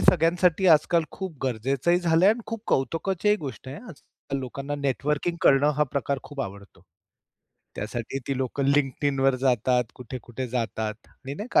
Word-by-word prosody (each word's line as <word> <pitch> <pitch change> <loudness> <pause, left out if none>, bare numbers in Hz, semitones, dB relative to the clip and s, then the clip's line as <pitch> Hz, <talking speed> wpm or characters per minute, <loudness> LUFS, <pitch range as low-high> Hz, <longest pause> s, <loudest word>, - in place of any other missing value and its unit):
सगळ्यांसाठी 175 +2 +4
आजकाल 165 +2 +2
खूप 190 -4 -5
गरजेचंही 135 +7 +1
झालंय 170 +1 +4
आणि 225 +3 +2
खूप 225 -2 -5
कौतुकाचीही 180 - +1
गोष्ट 135 -6 -7
आहे. 135 - -6
आजकाल 155 - -8
लोकांना 140 +3 -5
नेटवर्किंग 145 +4 -1
करणं 140 +2 +5
हा - - +5
प्रकार 140 0 -1
खूप 145 -2 -7
आवडतो. 100 -4 -8 0.9
त्यासाठी 115 +5 -4
ती 140 - 0
लोकं 135 +1 -1
LinkedInवर 135 -1 +2
जातात, 125 -1 +2
कुठे-कुठे 125 0 -6
जातात 110 -3 -2
आणि 140 +1 -9
नाही 210 - -5
का - - +6
140 Hz, 145 wpm, -26 LUFS, 130-165 Hz, 0.9 s, का